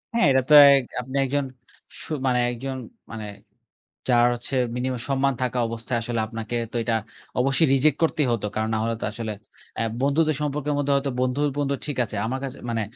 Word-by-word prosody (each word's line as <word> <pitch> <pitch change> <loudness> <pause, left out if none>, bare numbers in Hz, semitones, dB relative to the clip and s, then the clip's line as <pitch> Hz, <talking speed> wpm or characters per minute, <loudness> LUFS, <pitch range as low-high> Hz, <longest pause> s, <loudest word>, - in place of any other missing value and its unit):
হ্যাঁ, 230 - +4
এটা 130 0 +4
তো - - +5 0.2
এক 135 - +2 0.2
আপনি 130 +2 -9
একজন 140 +1 -1 0.6
সু - - -8 0.2
মানে 125 -1 +2
একজন 130 +3 -5 0.4
মানে 110 -1 -6 0.8
যার 120 -1 +5
হচ্ছে 120 +3 -3 0.2
মিনিমাম 125 0 -2
সম্মান 135 0 +2
থাকা 125 0 -1
অবস্থায়, 115 +1 -3
আসলে 115 0 -2
আপনাকে 115 +1 -5 0.2
তো - - -10
এইটা 115 -1 0 0.4
অবশ্যই 135 +4 +3
রিজেক্ট 140 +2 +3
করতেই 155 -4 +1
হতো। 110 -3 -1
কারণ 110 0 -1
না - - +1
হলে 115 0 0
তো - - -1
আসলে 110 -1 -4 0.4
অ্যা 115 - -1 0.2
বন্ধুত্বের 155 +2 +2
সম্পর্কের 150 0 -1
মধ্যে, 145 0 0
হয়তো 140 -1 0
বন্ধুর 130 +3 +1
বন্ধু 140 -1 0
ঠিক 145 -2 -4
আছে। 105 - -7
আমার 130 +3 -2
কাছে 135 - -5
মানে 115 -1 -1
130 Hz, 190 wpm, -24 LUFS, 115-140 Hz, 0.8 s, তো